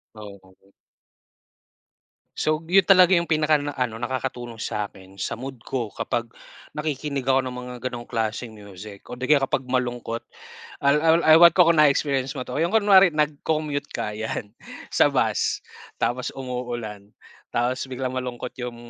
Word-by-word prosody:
Oo. 100 -2 -14 1.7
So, 155 0 +1
yun 190 +2 +5
talaga 185 0 +6
yung 170 -1 0
pinaka 155 0 +3
ano 135 -5 -2
nakakatulong 120 -1 -4
sa'kin 100 -3 -5
sa 105 - -4
mood 135 +1 -6
ko. 120 -4 -3
Kapag 120 +3 -3 0.5
nakikinig 150 -2 -3
ako 135 0 +3
ng 130 -1 -4
mga 125 0 -8
ganong 120 -1 -6
klaseng 115 0 -3
music. 100 -1 -12
O - - -7
'di 125 - -9
kaya 150 - +6
kapag 130 - -1
malungkot 125 -2 -2 0.6
al 140 +2 +4
al 165 +1 +4
ewan 170 +1 +8
ko 175 -2 +6
kung 165 - +1
na 150 - +7
experience 135 -1 -1
mo 130 - -3
'to, 125 +3 -5
yung 170 +6 +1
kunwari 200 -3 +7
nag-commute 150 -1 -1
ka, 105 - -3
yan 110 -1 -4 0.4
sa - - +4
bus - - 0 0.4
tapos, 125 +1 -1
umuulan. 120 -5 -5 0.5
Tapos 125 +2 0
biglang 130 0 -4
malungkot 125 -1 -4
yung 120 -1 -5
130 Hz, 150 wpm, -24 LUFS, 120-150 Hz, 1.7 s, ewan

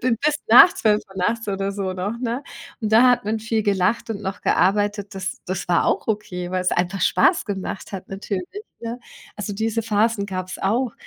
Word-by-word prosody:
Bin 250 -2 +2
bis 300 0 +3
nach 245 +10 +9
12:00 210 -3 0
nachts 225 +5 -1
oder 195 0 -1
so 195 -2 -3
noch, 200 +5 -4
ne? 245 +2 -2 0.4
Und 215 -1 -2
da 240 +3 +7
hat 245 -1 +1
man 220 +1 -1
viel 220 0 -1
gelacht 200 +3 0
und 205 - -4
noch 190 - -4
gearbeitet. 205 +1 +1
Das 190 0 -4
das 185 0 -3
war 175 - +3
auch - - 0
okay, 205 -5 -3
weil's 185 0 0
einfach 185 +2 -1
Spaß 185 - +3
gemacht 195 -3 -5
hat 190 - -7
natürlich, 195 - -5 0.2
ne? 235 +1 -5 0.4
Also, 210 0 -4
diese 225 +2 -1
Phasen 215 -1 +1
gab's 185 -1 -5
auch. 230 +4 0
205 Hz, 190 wpm, -22 LUFS, 190-225 Hz, 0.4 s, nach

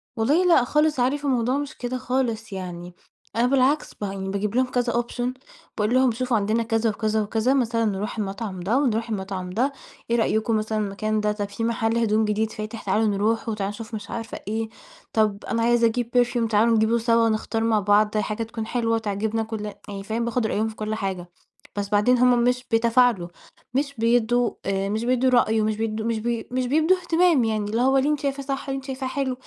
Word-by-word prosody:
والله 285 +11 +2
لأ 340 -8 +5
خالص 300 +2 +1
عارف 280 +4 +1
الموضوع 255 -1 +1
مش 285 -1 -5
كده 250 +1 -3
خالص، 235 -4 -2
يعني 180 -2 -6 0.4
أنا 235 +2 +3
بالعكس، 275 +3 +2
بان 195 -1 -4
باجيب 200 +2 -2
لهم 255 +1 +3
كذا 245 -1 0
Option، 245 +1 -2 0.4
باقول 215 +2 +1
لهم: 260 -1 +4
"شوفوا 245 +1 0
عندنا،" 215 +3 +1
كذا 225 0 +1
وكذا 215 0 0
وكذا. 220 +4 +1
مثلًا 230 -4 +1
نروح 210 +2 -2
المطعم 200 -1 -4
ده 200 +8 +1
ونروح 230 -4 0
المطعم 190 -3 -4
ده. 245 +9 0 0.4
"إيه - - +4
رأيكم 220 0 +1
مثلًا 215 0 -2
المكان 215 +1 -1
ده؟ 210 0 +1
طَب 205 -1 -3
في 205 +3 -5
مَحَل 225 0 0
هدوم 220 -1 +2
جديد 215 +1 0
فاتح، 215 +1 -6
تعالوا 210 +3 +1
نروحه 215 +3 0
وتعالوا 200 -2 -2
نشوف." 220 +1 -8
مش 210 -1 -7
عارفة 225 -1 -5
إيه. 220 +1 -2 0.4
"طَب 215 -2 +1
أنا 230 -1 -1
عايزة 235 0 +4
أجيب 235 +1 -2
Perfume 240 -1 -1
تعالوا 225 +2 +4
نجيبه 220 +1 +3
سوا 230 0 +3
ونختار 225 0 -1
مع 225 -1 +3
بعض 210 +1 +3
حاجة 215 +1 -1
تكون 225 0 -5
حلوة 230 -2 0
وتعجبنا 220 +1 -1
كل" 220 -1 -5 0.2
يعني 200 -1 -6
فاهم 225 +3 -2
باخُد 235 -1 0
رأيهم 220 +1 0
في 220 - -7
كل 215 0 -3
حاجة. 190 -4 -4 0.5
بس 200 -1 -3
بعدين 210 +5 +3
هم 245 -1 +4
مش 250 +1 +1
بيتفاعلوا، 230 -4 +3 0.5
مش 280 +2 0
بيدّوا 235 +1 +2
آآ 195 0 -1
مش 215 +2 -1
بيدّوا 255 +1 +2
رأي 225 -3 +3
ومش 215 0 0
بيدّوا 220 0 -2
مش 230 -1 0
بي 230 0 -2
مش 255 0 -1
بيدّوا 315 +7 +3
اهتمام 345 -5 +3
يعني، 215 -2 -1
اللي 230 +2 +1
هو 265 +2 +4
"اللي 270 +2 +2
أنتِ 300 -1 +1
شايفاه 275 -1 -2
صح، 275 0 -4
اللي 270 - -1
أنتِ 270 - -8
شايفاه 265 -1 -4
حلو، 260 0 -1
225 Hz, 205 wpm, -24 LUFS, 215-250 Hz, 0.5 s, لأ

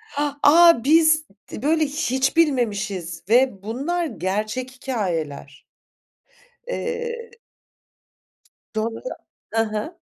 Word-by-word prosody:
h 290 - +1 0.2
aaa, 335 -4 +7
biz 315 +2 +4 0.3
d - - -7
böyle 315 +1 +3
hiç 275 -1 -1
bilmemişiz 205 - 0
ve 240 -5 +3
bunlar 285 +11 -2
gerçek 215 - -3
hikâyeler. 170 - -4 1.0
Eee 470 -1 -4 1.4
Doğru, 225 +1 -2 0.5
hı 225 0 +3
hı. 215 +10 -5
255 Hz, 90 wpm, -22 LUFS, 215-315 Hz, 1.4 s, aaa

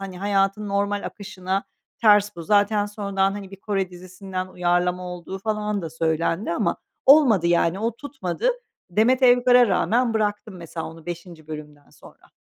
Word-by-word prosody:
Hani, 190 -2 -7
hayatın 200 +1 0
normal 200 0 0
akışına 195 -1 -4 0.4
ters 210 -2 +5
bu. 170 - -6
Zaten 205 +2 +2
sonradan, 200 -2 -1
hani, 200 -1 -7
bir 195 - -10
Kore 195 -3 -2
dizisinden 185 +1 -7
uyarlama 180 0 0
olduğu 180 +1 -7
falan 210 -1 -2
da 165 - -5
söylendi 165 +3 -1
ama 205 - 0 0.3
olmadı 265 - +6
yani. 170 +1 +2
O 230 +2 -2
tutmadı. 275 - -2 0.4
Demet 235 +8 +3
Evgar'a 245 0 +6
rağmen 230 +5 +1
bıraktım 210 -1 -1
mesela 165 -1 -6
onu 165 0 -12
5'inci 170 -2 -8
bölümden 150 -2 -10
sonra. - - -18
195 Hz, 150 wpm, -23 LUFS, 175-210 Hz, 0.4 s, olmadı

